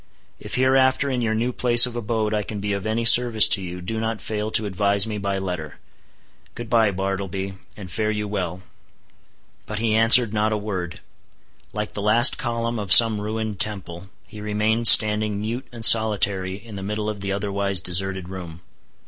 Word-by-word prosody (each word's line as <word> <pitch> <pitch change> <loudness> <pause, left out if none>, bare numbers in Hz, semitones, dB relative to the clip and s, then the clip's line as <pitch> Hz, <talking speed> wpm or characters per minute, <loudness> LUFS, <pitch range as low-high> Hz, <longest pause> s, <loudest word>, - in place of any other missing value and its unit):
If - - -8
hereafter 130 +1 0
in 125 -1 -3
your 110 -1 -2
new 120 +3 -3
place 120 -1 +5
of 125 -1 -9
abode 110 -2 -4
I 105 - -2
can 105 0 -7
be 100 0 -4
of 100 +1 -5
any 115 +1 -3
service 115 -2 +6
to 95 - +1
you, 90 0 -9
do 110 +5 -6
not 110 -1 -4
fail 105 0 -5
to 110 0 +1
advise 100 0 +2
me 105 -2 -6
by 100 0 -4
letter. 90 -6 -7 0.8
Good 120 -2 -10
bye, 115 -3 +2
Bartleby, 95 0 -5 0.2
and 95 -4 -11
fare 110 +4 -3
you 105 -1 -4
well." 95 -3 -6 1.0
But 105 - -6
he 110 0 -2
answered 115 0 +4
not 110 0 -1
a 110 - -2
word; 95 -5 -7 0.7
like 105 -1 -6
the 105 - -7
last 115 +4 +3
column 115 -1 -4
of 100 -4 -7
some 110 -1 +7
ruined 110 -1 -6
temple, 95 -3 -4 0.2
he 105 +4 -13
remained 105 +2 -1
standing 105 -1 +6
mute 120 +5 -6
and 115 -2 +1
solitary 100 -4 +4
in 105 +1 -12
the - - -8
middle 105 +2 -5
of 105 -2 -6
the 100 0 -5
otherwise 100 -1 -3
deserted 95 +1 -4
room. 90 -3 -10
105 Hz, 185 wpm, -20 LUFS, 95-110 Hz, 1.0 s, some